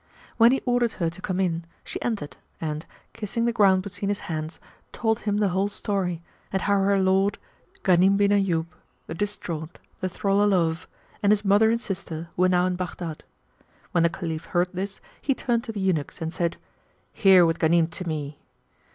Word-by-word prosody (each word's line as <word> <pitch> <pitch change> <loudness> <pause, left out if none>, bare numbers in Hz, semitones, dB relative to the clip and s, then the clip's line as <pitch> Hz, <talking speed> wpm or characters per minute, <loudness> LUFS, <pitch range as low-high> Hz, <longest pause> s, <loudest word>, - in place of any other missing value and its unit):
When 230 +1 +7
he 270 - 0
ordered 245 -2 +2
her 170 -3 -1
to 175 - -11
come 185 0 -2
in, 170 -3 0 0.2
she - - -6
entered 210 -11 -3 0.2
and, 155 0 -4 0.3
kissing 230 +1 -2
the 235 - +1
ground 195 -4 +4
between 200 +1 -4
his 205 - -1
hands, 155 0 -5 0.3
told 225 -1 0
him 205 -2 -1
the 205 -2 +2
whole 190 +3 +1
story 190 -4 -2 0.3
and 190 -2 -1
how 200 -1 +3
her 200 +1 +3
lord, 190 +1 +2 0.5
Ghanim 190 +2 +5
bin 200 0 +3
Ayyub, 190 -5 +2
yclept - - -24 0.4
the - - -6
Distraught, 170 -4 -4 0.2
the 185 - -2
Thrall 195 +2 +1
o' 205 - +4
Love, 170 -4 +1 0.3
and 205 - +4
his 210 0 +2
mother 205 +3 +5
and 230 +1 +2
sister 170 -6 -5
were 185 +1 +3
now 180 0 +3
in 185 0 0
Baghdad. 175 -3 -5 0.7
When 170 - +2
the 170 - +4
Caliph 165 -2 -5
heard 175 +1 +1
this, 195 +2 -4 0.2
he 275 - +1
turned 235 -3 0
to 230 - -4
the 210 - -5
eunuchs 185 -7 -1
and 165 0 -4
said, 170 -1 -1 0.6
"Here 190 -3 +6
with 165 0 0
Ghanim 165 0 +3
to 180 - -5
me." 150 -2 -4
190 Hz, 195 wpm, -25 LUFS, 170-205 Hz, 0.7 s, When